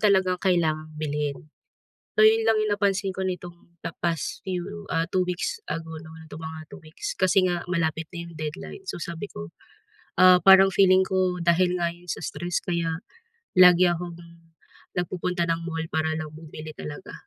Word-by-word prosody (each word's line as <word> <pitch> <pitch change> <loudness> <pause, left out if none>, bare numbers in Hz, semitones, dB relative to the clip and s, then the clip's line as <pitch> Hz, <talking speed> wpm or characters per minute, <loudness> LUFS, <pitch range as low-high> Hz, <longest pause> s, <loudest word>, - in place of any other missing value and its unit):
talagang 190 -3 +3
kailangang 155 -4 +1
bilhin. 150 -2 -2 0.8
So - - +3
yon 220 +1 +6
lang 220 -1 +3
yung 215 - 0
napansin 195 -1 +1
ko 190 0 -3
nitong 180 -2 -5 0.2
the - - -3
past 165 -4 -2
few, 195 +2 -4
ah, 165 +1 +1
2 185 -1 +1
weeks 180 - -2
ago, 160 0 -5
no, 160 - -12
nitong 155 +1 -9
mga 160 0 -6
2 - - -10
weeks, 155 +1 -6
kasi 190 0 +4
nga 175 -1 -1
malapit 165 -2 0
na 170 -1 -6
yung 170 - -13
deadline. 155 - -6
So 175 - -5
sabi 170 +1 -5
ko, 85 0 -7 0.7
ah, 185 -1 +8
parang 195 0 +8
feeling 190 -1 +5
ko, 185 -1 0
dahil 175 +1 +2
nga 170 -1 0
'yon 175 0 -16
sa - - -4
stress 175 0 -2
kaya 170 -3 -1 0.6
lagi 180 0 +7
akong 175 0 -2 0.8
nagpupunta 180 0 -1
ng 165 0 0
mall 165 -1 -3
para 160 0 0
lang 155 -1 -5
bumili 155 0 -9
talaga. 150 -1 -8
175 Hz, 175 wpm, -25 LUFS, 160-185 Hz, 0.8 s, ah